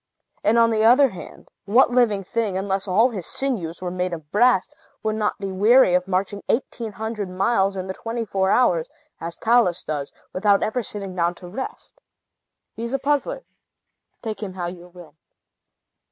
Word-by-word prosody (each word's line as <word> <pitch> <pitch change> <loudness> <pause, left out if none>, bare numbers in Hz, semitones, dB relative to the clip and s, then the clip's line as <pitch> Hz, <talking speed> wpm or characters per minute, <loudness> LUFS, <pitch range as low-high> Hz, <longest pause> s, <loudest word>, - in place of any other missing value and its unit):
And, 220 +3 +3
on 230 0 +5
the 220 -1 +1
other 255 +5 +6
hand, 185 - -11 0.2
what 240 +5 +4
living 230 -5 +2
thing, 210 -1 -2
unless 195 0 -1 0.3
his 185 -7 -4
sinews 185 -11 -1
were 180 - -3
made 180 0 -2
of 150 -3 -14
brass, 240 -2 +4 0.4
would 215 0 0
not 210 -1 -1
be 195 -1 -5
weary 210 +2 +5
of 180 +1 +2
marching 195 +2 -1
eighteen 230 -3 -2
hundred 220 -3 -4
miles 195 +1 +1
in 185 - -3
the 190 - -4
twenty 230 +3 -4
four 190 -2 0
hours, 180 -9 +2 0.3
as 165 +1 -6
Talus 225 -7 +2
does, 145 -2 -4 0.2
without 200 +1 +3
ever 245 +3 -1
sitting 200 -4 -4
down 175 0 0
to 180 - -11
rest? 260 - -8 0.7
He - - -9
is 235 +2 -4
a - - +2
puzzler, 295 - -1 0.8
take 220 -2 -5
him 195 -3 -5
how 180 -2 -4
you 175 0 -7
will." 175 -4 -14
200 Hz, 175 wpm, -23 LUFS, 185-230 Hz, 0.8 s, other